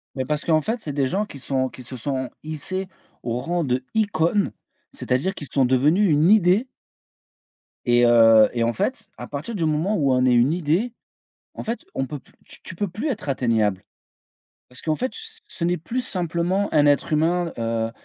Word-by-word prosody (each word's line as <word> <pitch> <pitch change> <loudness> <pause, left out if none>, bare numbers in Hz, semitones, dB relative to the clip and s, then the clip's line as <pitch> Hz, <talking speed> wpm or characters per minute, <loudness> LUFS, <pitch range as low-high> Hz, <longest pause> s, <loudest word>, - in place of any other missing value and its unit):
Mais 130 - -2
parce 150 +3 -1
qu'en 160 -2 +3
fait, 225 +7 -2
c'est 145 - -5
des 135 -2 +1
gens 200 +9 -1
qui 140 -9 -11
sont 130 0 -1
qui 125 - -11
se 130 +2 -8
sont 130 0 -3
hissés 185 +5 -4 0.4
au 120 0 -2
rang 175 +4 -1
d'icône, 160 - 0 0.4
c'est-à-dire 135 +10 -1
qu'ils 145 - -7
sont 135 -2 +3
devenus 150 +10 +3
une 155 +4 +4
idée 210 +3 +4 1.2
et 120 0 +4
heu 115 -2 +7
et 120 - 0
en 115 0 +1
fait, 215 +1 -3
à - - -7
partir 150 +11 -5
du 170 -5 0
moment 160 +7 0
où 140 -6 +2
on 125 0 +2
est 125 - +4
une 120 +6 +4
idée, 180 +8 0 0.6
en - - -7
fait 230 +2 -4
on 135 - -1
peut 145 +2 -6
plus 130 - -23
tu - - -11
tu 170 - -6
peux 205 - -1
plus 220 - -4
être 215 - -4
atteignable. 110 -7 +1 0.9
Parce 125 +2 -9
qu'en 155 -1 0
fait 255 +8 -2
ce 450 0 -9
ce 170 - -7
n'est 175 +1 +1
plus 235 +11 -3
simplement 180 +1 -1
un 150 -1 +5
être 145 +2 +2
humain, 170 +2 +1
heu, 115 0 -1
155 Hz, 195 wpm, -23 LUFS, 130-190 Hz, 1.2 s, heu